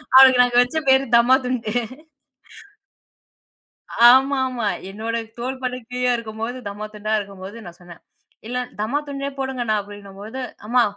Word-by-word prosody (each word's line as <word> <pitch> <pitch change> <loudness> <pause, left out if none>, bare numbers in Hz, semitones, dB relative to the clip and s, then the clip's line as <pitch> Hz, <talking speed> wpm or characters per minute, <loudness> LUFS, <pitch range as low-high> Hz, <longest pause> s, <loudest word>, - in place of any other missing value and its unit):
அவளுக்கு 260 -1 +9
நாங்க 245 0 0
வச்ச 285 +6 -5
பேரு 265 +1 +5
தம்மா 245 +2 +5
துண்டு 235 -4 -2 2.4
ஆமாமா, 260 -3 +3 0.2
என்னோட 225 +3 -4 0.2
தோல்பட்டக்கு 255 -1 -4
கீழ 250 0 0
இருக்கும்போது 225 +2 -5
தம்மா 205 +1 -6
துண்டா 215 +1 -4
இருக்கும்போது 195 +1 -8
நான் 175 0 -11
சொன்னேன், 175 -1 -14 0.5
"இல்ல 250 +1 -3 0.2
தம்மா 240 +7 0
துண்டுண்ணே 280 0 -4
போடுங்கண்ணா" 255 -5 -1
அப்பிடின்னம்போது, 205 +4 -9 0.3
"அம்மா 245 +2 +3
240 Hz, 120 wpm, -21 LUFS, 215-260 Hz, 2.4 s, அவளுக்கு